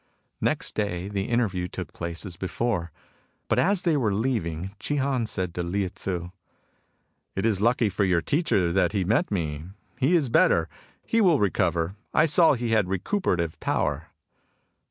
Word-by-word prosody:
Next - - 0
day 95 -3 -2
the 100 -1 -2
interview 105 -7 0
took - - -7
place 85 +2 -4
as 90 -3 -7
before; 95 -1 -2 0.6
but - - +2
as 190 0 +2
they 170 -3 +2
were 120 -7 +1
leaving 95 -7 -2
Chi 145 - -2
Han 135 -4 0
said 90 -4 -3
to 90 - -3
Lieh 95 +2 -1
Tzu: 90 -2 -4 0.5
" - - -47
It 95 - -1
is 105 -4 +1
lucky 120 0 +3
for 100 +1 0
your 90 -3 +2
teacher 100 - +1
that 95 +2 +2
he 100 -3 +1
met 110 +6 +1
me. 80 -6 -3 0.3
He 145 +8 +3
is 150 -7 +2
better. - - +4 0.4
He 230 - +2
will 175 -7 +5
recover. 90 -3 0 0.2
I 155 - +5
saw 165 0 +5
he 120 -3 -2
had 110 -4 +3
recuperative 90 - -1
power." - - -1
100 Hz, 170 wpm, -26 LUFS, 90-125 Hz, 0.6 s, will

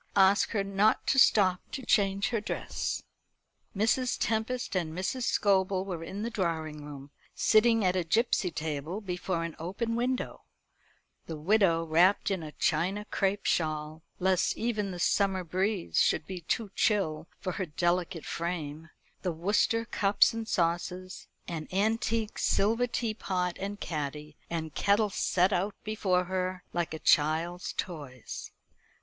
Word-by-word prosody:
Ask 195 +1 +5
her 205 -3 0
not 200 +2 +2
to 265 - +3
stop 185 -7 +5
to 265 - -5
change 195 -2 +2
her 230 -3 -1
dress." - - -3 0.7
Mrs. 245 +4 +2
Tempest 225 +1 -1
and 165 -2 -2
Mrs. 235 +7 -2
Scobel 190 -1 +2
were 175 -4 -5
in 195 +5 -5
the 235 - -3
drawing 160 -7 -2
room, 145 -1 -9 0.2
sitting 225 -1 +4
at 180 0 +2
a 185 - +1
gipsy 200 +1 +2
table 155 +3 -4
before 180 -3 -3
an 165 -1 -5
open 200 +8 -2
window; 250 +2 -2 0.9
the 160 - -4
widow 170 0 +3
wrapped 175 +6 +3
in 190 -3 -1
a 155 -1 -7
China 185 +7 0
crape 200 0 0
shawl, 155 -1 -1 0.2
lest 185 0 +1
even 215 -4 -1
the 180 - -5
summer 190 +1 +1
breeze 185 +2 0
should - - +2
be 185 -2 -6
too 205 +5 -2
chill 165 -7 +1
for 185 - -3
her 185 0 -3
delicate 175 +1 -1
frame, 165 -2 -4 0.3
the 180 - -1
Worcester 205 +7 +1
cups 200 -2 +3
and 225 -1 -4
saucers, 180 0 -2 0.2
and 160 -3 -5
antique 220 +2 0
silver 225 +5 +2
tea 235 -2 -1
pot 180 -4 -2
and 200 +1 -4
caddy 150 -2 -4
and 160 -2 -3
kettle 205 +1 +2
set 185 +1 +2
out 195 +3 0
before 195 -4 +1
her, 185 0 -3
like 175 -1 -1
a - - -4
child's 160 +4 +2
toys. 145 -8 -6
185 Hz, 145 wpm, -29 LUFS, 165-210 Hz, 0.9 s, Ask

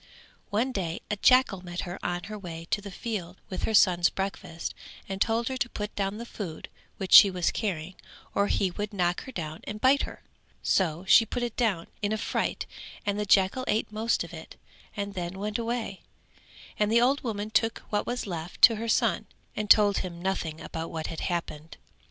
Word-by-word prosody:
One 230 +6 +1
day 175 -7 -3
a - - +2
jackal 225 -4 +4
met 175 -1 -4
her 175 +1 -7
on 175 0 -2
her 215 0 -7
way 165 -3 -7
to 205 - +1
the 200 - -8
field 190 -3 -5
with 185 - -2
her 220 - -1
son's 175 -3 +5
breakfast 190 -3 -4 0.3
and 195 0 -5
told 230 +1 +2
her 260 - -2
to 245 0 -1
put 210 -2 -5
down 200 +1 -1
the 235 - -6
food 185 -9 -7 0.3
which 190 - -2
she 200 - +11
was 180 -2 0
carrying 185 -5 -3 0.4
or 200 0 +2
he 190 -2 +1
would 205 +3 -4
knock 180 -1 0
her 260 - -8
down 160 -7 -5
and 210 +1 -5
bite 265 +5 +4
her; - - -6 0.4
so 175 -1 +1
she 225 - +8
put 240 +2 -3
it 240 -2 -3
down 205 -9 +1 0.2
in 205 0 0
a 220 - +1
fright - - -2 0.4
and 205 0 0
the 210 - -2
jackal 195 +6 +4
ate 215 0 0
most 220 +2 0
of - - -10
it - - -10 0.4
and 200 0 -3
then 180 0 -4
went 210 +3 -2
away 230 -4 -3 0.8
and 210 0 +2
the 230 - +5
old 265 +4 +3
woman 215 -3 -3
took 225 +1 +1
what 205 -1 0
was 245 +1 -2
left 170 -3 -6
to 225 -2 +9
her 230 +1 -3
son - - +2 0.3
and 210 -1 -3
told 205 -2 +6
him 175 -2 -5
nothing 170 -4 -2
about 165 0 -5
what 160 -1 -4
had 160 - -6
happened. 165 -3 -4
200 Hz, 205 wpm, -28 LUFS, 175-220 Hz, 0.8 s, she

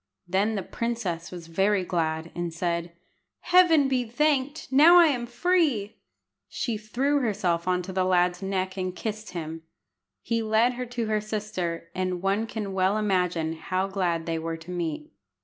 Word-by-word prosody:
Then 200 +5 +1
the 195 - -2
princess 205 -7 -3
was 175 -2 -8
very 195 +4 +1
glad, 160 -2 -2
and 175 -1 -3
said 170 0 -2 0.5
"Heaven 345 -6 +5
be 260 -2 +1
thanked! 275 +3 0
Now 315 +6 +8
I 345 - +8
am 245 -4 -2
free!" 250 - +1 0.5
She 235 -4 -2
threw 250 +7 0
herself 190 -8 0
on 180 0 +1
the 185 0 -1
lad's 180 0 +2
neck 190 -1 -2
and 185 -1 -3
kissed 215 0 -5
him. 165 -1 -5 0.6
He 230 -1 0
led 220 +3 +3
her 250 0 -5
to 240 -1 -3
her 215 -1 0
sister, 185 -6 -4
and 185 -1 -2
one 200 +3 +1
can 210 -4 -4
well 190 +2 +2
imagine 180 -6 0
how 185 +4 -2
glad 180 -4 -1
they 165 -1 -2
were 165 0 -4
to 165 +2 -10
meet. 165 -4 -4
195 Hz, 165 wpm, -26 LUFS, 175-230 Hz, 0.6 s, Now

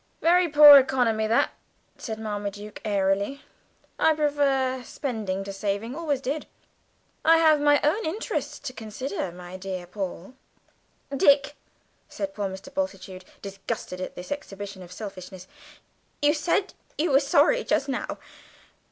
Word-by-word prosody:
"Very 350 +1 +4
poor 290 -1 +10
economy 240 -5 +1
that," 230 +2 +2 0.4
said 220 -2 -6
Marmaduke 205 -1 -5
airily. 200 +5 0 0.6
"I 320 - +4
prefer 275 -3 +1
spending 215 -9 -4
to 195 0 -7
saving, 205 +4 -3
always 295 -5 -2
did. 285 +4 -3 0.8
I 325 +1 +6
have 315 -2 +4
my 290 0 +5
own 320 +10 +1
interests 370 +9 -3
to 275 -2 -7
consider, 220 -3 -5
my 180 +1 -9
dear 185 -1 -5
Paul." 190 +3 -6 0.8
"Dick," 280 +1 +4 0.5
said 295 -1 -5
poor 205 -5 -3
Mr. 190 +9 -10
Bultitude, 190 -10 -4 0.2
disgusted 195 -2 -5
at 185 - -6
this 180 - -9
exhibition 205 -8 -6
of 180 -1 -12
selfishness, 185 -2 -8 0.7
"you 290 0 +3
said 335 +5 0 0.2
you 315 +1 +1
were 270 - +6
sorry 290 - +3
just 275 - 0
now. 270 - -3
250 Hz, 135 wpm, -25 LUFS, 195-290 Hz, 0.8 s, poor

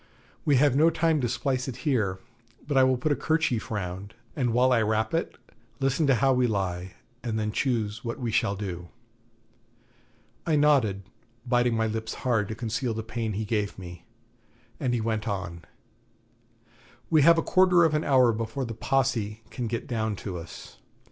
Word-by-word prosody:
'We 145 - +4
have 135 0 +4
no 155 +4 +5
time 160 -2 +1
to 120 - 0
splice 130 +1 -1
it 130 - -4
here, 110 -10 +1 0.5
but 145 - -1
I 135 - +6
will 130 -1 +3
put 155 +5 -1
a - - +3
kerchief 160 -8 0
round, 100 0 -5 0.2
and 125 -5 0
while 125 +2 +3
I 120 -2 +4
wrap 110 0 0
it, 165 - -2 0.4
listen 135 +3 +1
to 135 - +5
how 135 +2 +3
we 125 -1 +2
lie, 95 -4 -3 0.3
and 115 -3 -2
then 105 -1 -1
choose 110 -3 -1
what 115 -1 -4
we 120 -3 -2
shall 100 -2 +1
do.' 90 -4 -6 1.5
I 160 - +1
nodded, 135 -10 +3 0.4
biting 120 -1 +2
my 110 0 +1
lips 110 0 -3
hard 115 -5 +2
to 110 - -5
conceal 115 +1 -2
the 110 - -4
pain 115 -1 -3
he 110 +2 -3
gave 105 -1 -2
me, 90 -2 -10 0.7
and 125 -3 0
he 115 - -1
went 110 -1 -2
on: 95 -5 -4 1.5
'We 155 -2 +5
have 165 +4 +6
a 165 - +1
quarter 180 -2 +4
of 160 -2 +3
an 150 +1 +1
hour 130 -4 +4
before 115 +4 -3
the 115 - -5
Posse 115 -4 -1
can 120 -2 -3
get 115 +1 -3
down 110 -3 -2
to 95 -1 -6
us. 85 - -11
115 Hz, 180 wpm, -27 LUFS, 105-135 Hz, 1.5 s, I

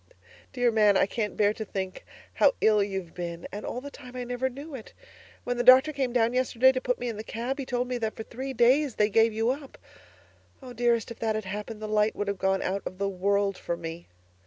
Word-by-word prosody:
Dear 245 -2 +2
Man, 210 -3 +4
I - - +4
can't 210 +1 -3
bear 205 0 +3
to 220 - -5
think 190 -2 -5 0.3
how - - +4
ill 215 -1 +4
you've 190 -4 -3
been 170 -1 -6
and 205 +2 -6
all 250 - -4
the 285 +1 -8
time 250 -3 -12
I 250 - -3
never 245 +2 -2
knew 280 +4 -9
it. 245 -5 -9 0.5
When 245 0 -2
the 245 - +1
doctor 260 +5 +7
came 265 -3 -1
down 235 -1 +2
yesterday 255 0 +4
to 255 -1 -3
put 250 -1 0
me 245 - -4
in 225 -3 -4
the 215 - -5
cab, 245 +6 -4
he 265 - -4
told 245 0 -1
me 250 -1 -2
that 220 -1 -2
for 220 - -6
three 260 +4 -6
days 260 +2 +3
they 210 0 +2
gave 225 +2 +4
you 225 +3 +1
up. 275 0 -7 0.8
Oh, 255 -2 -10
dearest, 235 -1 +1
if 235 - -9
that 220 -1 0
had 215 -2 -3
happened, 210 +3 -6
the - - -3
light 210 0 +2
would 205 - -3
have 200 -2 -3
gone 190 0 +1
out 195 +2 -1
of 185 - -6
the 200 0 -1
world 200 +1 0
for 170 - -3
me. 165 0 -7
225 Hz, 245 wpm, -27 LUFS, 200-250 Hz, 0.8 s, doctor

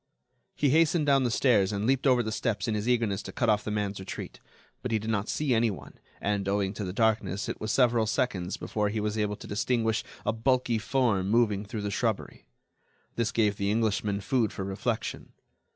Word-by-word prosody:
He 145 -3 +2
hastened 160 0 +3
down 140 -2 +4
the - - +2
stairs 110 -5 +3
and 100 0 -2
leaped 135 +3 +2
over 125 -2 +4
the 110 - -3
steps 110 0 -1
in 110 - 0
his 105 +3 -1
eagerness 115 -5 +1
to - - -8
cut 120 - 0
off 105 0 +1
the - - -4
man's 105 -2 -2
retreat. 95 - -7 0.4
But 125 - -3
he 110 - +3
did 110 +1 -3
not 105 0 -1
see 145 -4 0
anyone, 115 -3 -1 0.2
and, 100 -1 -1
owing 100 -1 0
to 105 - -5
the 90 - -3
darkness, 105 -2 0
it - - -5
was 110 - -1
several 120 -4 +3
seconds 105 -6 -1
before 105 -1 -1
he 110 +1 -2
was 105 0 -1
able 105 -1 0
to - - -12
distinguish 110 +1 0 0.2
a - - +1
bulky 120 0 +1
form 110 -5 +1
moving 105 -3 +2
through 105 +1 -5
the 100 - -2
shrubbery. - - -2 0.7
This 115 -1 0
gave 105 -3 +1
the 100 -1 0
Englishman 105 -2 0
food 110 +2 +1
for 95 - -5
reflection. 100 +4 -3
110 Hz, 205 wpm, -28 LUFS, 100-120 Hz, 0.7 s, down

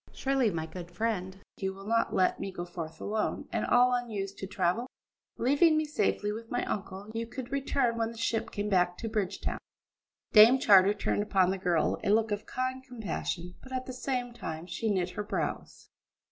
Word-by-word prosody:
Surely, 270 -4 +1
my 165 -4 -3
good 175 +1 -8
friend, 190 -1 -2 0.2
you 190 -1 -3
will 195 0 -11
not 230 +2 +1
let 185 - +2
me 195 - -4
go 175 -2 -5
forth 165 -2 -7
alone, 215 +1 -2
and - - -1
all 250 +1 +5
unused 210 -5 -2
to 195 - -4
travel? 190 +5 0 0.5
Leaving 290 +6 +4
me 310 - +1
safely 210 -8 0
with 225 +2 -7
my 245 - -1
uncle, 200 +1 -5
you 230 0 -3
could 250 +1 -7
return 275 -3 +1
when 225 0 +1
the 230 - -10
ship 225 0 -1
came 205 0 -3
back 180 -3 +2
to 230 - -4
Bridgetown." 210 -4 -2 0.7
Dame 225 +4 +9
Charter 200 -4 +6
turned - - 0
upon 190 -3 +2
the 195 - -3
girl 175 -3 +1
a - - 0
look 220 +1 +3
of 205 +1 -3
kind 255 +1 -2
compassion, 195 -7 -4
but 260 - -13
at 255 0 -2
the 255 - -6
same 250 -1 -2
time 160 -7 -6
she 185 +5 -2
knit 185 -3 0
her 210 - -4
brows. 205 - -4
215 Hz, 195 wpm, -30 LUFS, 190-245 Hz, 0.7 s, Dame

